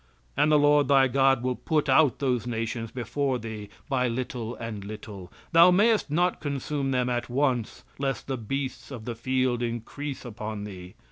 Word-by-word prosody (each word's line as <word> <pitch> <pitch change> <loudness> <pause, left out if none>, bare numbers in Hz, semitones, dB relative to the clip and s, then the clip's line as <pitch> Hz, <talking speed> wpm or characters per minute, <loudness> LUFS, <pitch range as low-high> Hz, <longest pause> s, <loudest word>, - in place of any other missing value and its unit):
"And 155 - +3
the 150 - +6
Lord 145 -1 +4
thy 135 -1 +5
God 135 -1 +3
will 125 0 0
put 150 +1 0
out 135 0 +4
those 125 -4 0
nations 115 0 -3
before 130 +3 -1
thee 110 -3 -7 0.2
by 130 -3 +1
little 120 -1 -3
and 110 -3 -6
little; 100 -3 -9 0.2
thou 170 +1 +8
mayest 210 +1 +3
not 175 +4 +1
consume 140 -1 -2
them 125 -2 +1
at 120 -1 -2
once, 125 -3 0 0.2
lest 135 -1 -2
the 135 - -2
beasts 130 +4 -4
of 120 -6 -8
the 120 - -3
field 130 +1 0
increase 120 +5 -4
upon 110 -2 -5
thee. 95 -3 -9
125 Hz, 175 wpm, -27 LUFS, 115-140 Hz, 0.2 s, thou